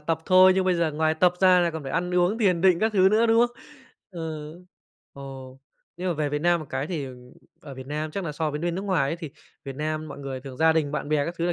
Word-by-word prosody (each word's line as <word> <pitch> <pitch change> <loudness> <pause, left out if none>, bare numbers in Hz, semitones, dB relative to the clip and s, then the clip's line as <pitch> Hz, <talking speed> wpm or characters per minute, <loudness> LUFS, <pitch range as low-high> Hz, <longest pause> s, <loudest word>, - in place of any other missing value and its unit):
tập 160 +1 -1
thôi 185 0 +7
nhưng 190 0 +1
bây 185 -1 +2
giờ 170 -2 0
ngoài 155 +1 +1
tập 175 +2 +3
ra 185 -1 +6
là 170 -1 +1
còn 160 -2 -6
phải 135 - -6
ăn 180 0 -1
uống 180 +5 +2
thiền 185 -7 +2
định 185 -1 +4
các 220 0 +1
thứ 190 -2 +5
nữa, 220 +3 +3
đúng 230 +1 +4
không? 240 0 -18 0.5
Ừ. 160 -4 -6 0.6
Ồ. 135 -1 -10 0.4
Nhưng 180 +1 -3
mà 175 - 0
về 150 -1 -1
Việt 150 +1 -2
Nam 175 +1 +2
một 155 - -8
cái 135 +2 -2
thì, 160 -4 -4
ờ, 130 - -9 0.5
ở 145 -6 -10
Việt 130 0 -10
Nam 150 +2 -4
chắc 195 +4 -4
là 150 - -4
so 155 +1 -2
với 150 +1 -5
bên 170 0 -2
nước 190 - -4
ngoài 185 -9 0
ấy, 165 - -3
thì 165 -4 -8 0.3
Việt 135 -1 -7
Nam 155 +1 -3
mọi - - -9
người 135 -2 -6
thường 130 -1 -10
gia 160 +3 +4
đình, 155 -3 0
bạn 145 - -3
bè 150 -2 +1
các 170 - -4
thứ 170 - 0
là 175 - +1
160 Hz, 285 wpm, -25 LUFS, 150-180 Hz, 0.6 s, thôi